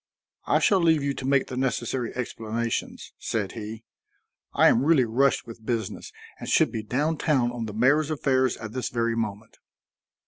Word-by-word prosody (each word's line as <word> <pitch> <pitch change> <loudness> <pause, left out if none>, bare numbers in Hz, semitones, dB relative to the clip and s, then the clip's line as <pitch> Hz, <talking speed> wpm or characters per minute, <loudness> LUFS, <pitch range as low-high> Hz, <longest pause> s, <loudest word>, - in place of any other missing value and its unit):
"I - - +4
shall 195 -3 +3
leave 160 -3 +3
you 140 0 0
to 130 - -5
make 140 -1 +3
the 130 - -7
necessary 125 -1 -1
explanations," 115 -1 -4
said 105 -4 -2
he. 110 0 -7 0.7
"I - - +5
am 120 - +4
really 145 -4 +4
rushed 130 +5 +2
with 115 -1 -11
business 110 -3 -3 0.3
and - - -6
should - - +3
be 110 - -3
down 145 +9 -1
town 130 -6 +1
on 120 -2 -4
the 105 - -6
mayor's 140 +7 +3
affairs 130 -4 +1
at 110 -1 -7
this 130 +1 -3
very 115 -1 0
moment." 110 -1 -5
120 Hz, 175 wpm, -26 LUFS, 115-140 Hz, 0.7 s, I